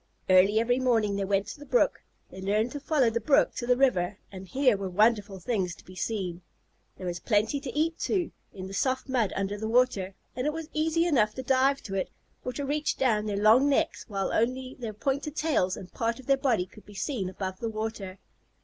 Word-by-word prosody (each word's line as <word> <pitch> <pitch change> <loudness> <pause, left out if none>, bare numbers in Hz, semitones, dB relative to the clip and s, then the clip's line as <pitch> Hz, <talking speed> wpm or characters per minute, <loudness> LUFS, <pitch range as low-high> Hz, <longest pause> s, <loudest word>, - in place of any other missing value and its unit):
Early 195 +4 +6
every 245 +2 +2
morning 225 -5 +2
they 200 0 -1
went 195 0 +1
to 205 - -8
the - - -9
brook. - - +2 0.3
They 190 - -9
learned 210 +5 +1
to 290 - -5
follow 285 -5 +2
the 235 +1 -1
brook 275 +5 +3
to 240 - -3
the 250 0 +4
river, 205 -8 +2
and 190 -1 -9
here 260 +1 +3
were 195 -1 -4
wonderful 210 0 +2
things 185 -3 -1
to - - -18
be 185 - -12
seen. 185 -2 -3 0.6
There 185 - -7
was 175 -1 -3
plenty 215 +7 +1
to 275 -1 -6
eat, 320 +1 +1
too, 365 -4 0 0.2
in 185 -1 -8
the 190 - -8
soft 260 +6 0
mud 245 -6 +1
under 195 +1 -2
the 220 - -3
water, 220 -5 +2 0.2
and 255 +3 -1
it 300 - 0
was 325 -1 -6
easy 320 +2 +1
enough 225 -11 +2
to 260 - -5
dive 270 +2 +2
to 195 - -7
it, 195 - -1 0.3
or 250 - -3
to 280 +3 -3
reach 295 +2 -1
down 215 -5 +1
their 205 -1 -1
long 225 +7 +5
necks 280 - 0
while 195 -3 -2
only 255 +3 0
their 230 -3 -5
pointed 275 +7 -2
tails 285 - +1
and 185 - -10
part 230 +1 -1
of 265 - -12
their 275 - +4
body 245 -9 +1
could 205 +3 -17
be 205 - -13
seen 195 -1 -2
above 185 0 -5
the 230 - -2
water. 215 -3 -5
225 Hz, 225 wpm, -28 LUFS, 195-265 Hz, 0.6 s, Early